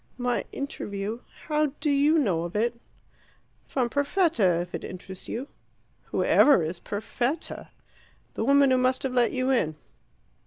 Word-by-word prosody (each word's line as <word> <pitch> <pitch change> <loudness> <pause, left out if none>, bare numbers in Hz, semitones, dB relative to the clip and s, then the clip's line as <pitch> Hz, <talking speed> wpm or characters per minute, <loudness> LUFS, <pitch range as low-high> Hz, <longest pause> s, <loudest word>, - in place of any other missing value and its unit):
"My 245 -1 -1
interview 210 -5 -4 0.3
how 305 -1 +1
do 295 0 +1
you 290 +3 +4
know 195 - +1
of 170 +2 -6
it?" 230 +3 +1 0.9
"From 255 -3 0
Perfetta, 285 - +2
if 175 0 -8
it - - -4
interests 185 0 -8
you." 255 +5 -4 0.6
"Who - - -1
ever 280 - +5
is 170 +3 -4
Perfetta?" 240 +8 -3 0.7
"The - - -2
woman 280 +2 +5
who 255 - +4
must 255 +1 +1
have 265 -2 -2
let 245 -2 +3
you 255 +1 0
in." 160 -12 +1
250 Hz, 150 wpm, -26 LUFS, 200-280 Hz, 0.9 s, ever